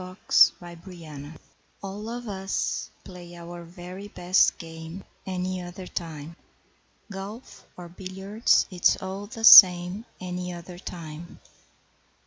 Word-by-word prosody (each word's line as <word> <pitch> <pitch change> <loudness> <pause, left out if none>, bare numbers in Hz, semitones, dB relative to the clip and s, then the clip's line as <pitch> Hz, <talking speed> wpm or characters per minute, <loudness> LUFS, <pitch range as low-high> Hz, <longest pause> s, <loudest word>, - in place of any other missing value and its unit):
Any 185 - -8
Other 185 - -13
Time 165 -6 0 0.5
All 205 +3 -6
of 240 0 -6
us 195 -1 -3
play 175 -2 -12
our 170 0 -9
very 180 +3 -10
best 185 -2 +2
game 165 +2 -10 0.2
Any 185 0 -3
other 180 +1 -9
time. 165 -2 -7 0.8
Golf 200 +5 -9
or 175 -1 -9
billiards, 190 +5 0
it's 180 -1 +3
all 190 +2 -6
the 225 0 -9
same 185 0 +8
Any 180 0 -5
other 175 +1 -10
time. 165 -2 -9
180 Hz, 115 wpm, -25 LUFS, 170-195 Hz, 0.8 s, same